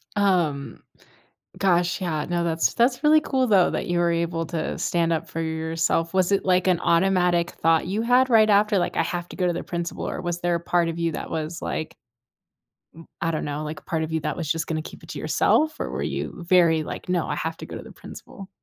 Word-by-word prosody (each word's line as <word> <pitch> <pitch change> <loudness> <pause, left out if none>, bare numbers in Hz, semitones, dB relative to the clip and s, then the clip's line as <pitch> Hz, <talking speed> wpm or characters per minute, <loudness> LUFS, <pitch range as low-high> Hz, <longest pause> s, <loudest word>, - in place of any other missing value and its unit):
Um, 175 -9 0 0.8
gosh, 175 -1 +2
yeah 155 -5 -2
no 175 0 0
that's 165 -1 +1
that's 245 +3 +2
really 310 +1 +6
cool 265 -4 0
though, 195 -6 +4
that - - -3
you 175 -2 0
were 170 0 +2
able 165 0 -1
to 160 -1 -3
stand 170 -1 0
up 160 - -2
for 165 - -4
yourself, 160 +1 -1
was 185 0 +2
it 200 - +2
like 185 0 +2
an 180 -2 +2
automatic 175 -1 +2
thought 165 0 +2
you 205 +5 -1
had 250 +2 +4
right 220 -2 +5
after, 205 0 +4
like, - - -1
“I - - +3
have 175 -3 -4
to - - -9
go 185 - 0
to 175 - +2
the 170 - -4
principal” 170 -1 -4
or - - -4
was 175 -1 -3
there 175 0 +1
a 170 - -1
part 170 0 +1
of 165 0 -4
you 170 -1 0
that - - -6
was, 160 +1 -4
like, 155 - -4 1.0
m 165 - -13
I 165 - 0
don't 155 - -2
know, 150 +1 -4
like 155 0 -6
a - - -33
part 160 -1 -2
of 160 - -4
you 160 - 0
that 150 -1 -3
was 160 -4 -4
just 165 0 0
gonna 155 -1 -2
keep - - -11
it - - -15
to - - -6
yourself 310 0 +2
or - - -3
were - - -4
you 175 - -4
very 170 -3 +4
like, - - -7
“No, 180 -2 0
I - - -2
have 160 0 -3
to - - -8
go - - -8
to - - -7
the - - -12
principal.” 195 -1 -11
170 Hz, 245 wpm, -24 LUFS, 165-190 Hz, 1.0 s, really